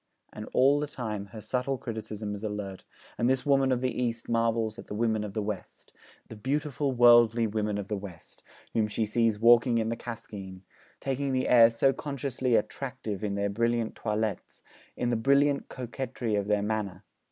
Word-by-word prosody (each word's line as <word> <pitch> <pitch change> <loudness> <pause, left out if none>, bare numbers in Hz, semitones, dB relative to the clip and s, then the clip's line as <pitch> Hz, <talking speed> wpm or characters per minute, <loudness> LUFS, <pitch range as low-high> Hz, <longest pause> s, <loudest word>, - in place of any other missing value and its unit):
And, 105 - -8
all 140 +3 +4
the 150 - -2
time, 110 -7 -5
her 110 +2 -10
subtle 125 +4 -1
criticism 110 -3 -5
is 100 - -6
alert, 105 -3 -5 0.3
and 120 - +2
this 130 -1 +1
woman 135 -2 +3
of 125 -1 +1
the 130 -1 -1
East 115 -1 -2
marvels 115 -1 0
at - - -10
the - - -6
women 110 -1 +1
of 105 -2 -7
the 110 - -1
West, 100 -3 -7 0.3
'the 110 - -10
beautiful 140 +3 -1
worldly 120 -2 +6
women 105 -1 -1
of 100 -1 -4
the 105 - -2
West,' 95 -4 -10 0.3
whom 110 -2 +2
she 110 +1 -1
sees 115 0 +1
walking 115 +2 +5
in 110 -1 0
the 115 - -1
Cascine, 100 -6 -8 0.4
'taking 135 0 -1
the 130 0 0
air 115 -2 +7
so 125 +4 +2
consciously 135 -4 -2
attractive 115 -3 -3
in 100 -1 -1
their 100 0 -1
brilliant 115 +1 0
toilettes, 110 -1 -3 0.3
in 120 0 0
the - - +2
brilliant 140 +4 +2
coquetry 125 -2 -4
of 100 -1 0
their 105 -1 +1
manner!' 105 -3 -3
115 Hz, 185 wpm, -28 LUFS, 105-125 Hz, 0.4 s, air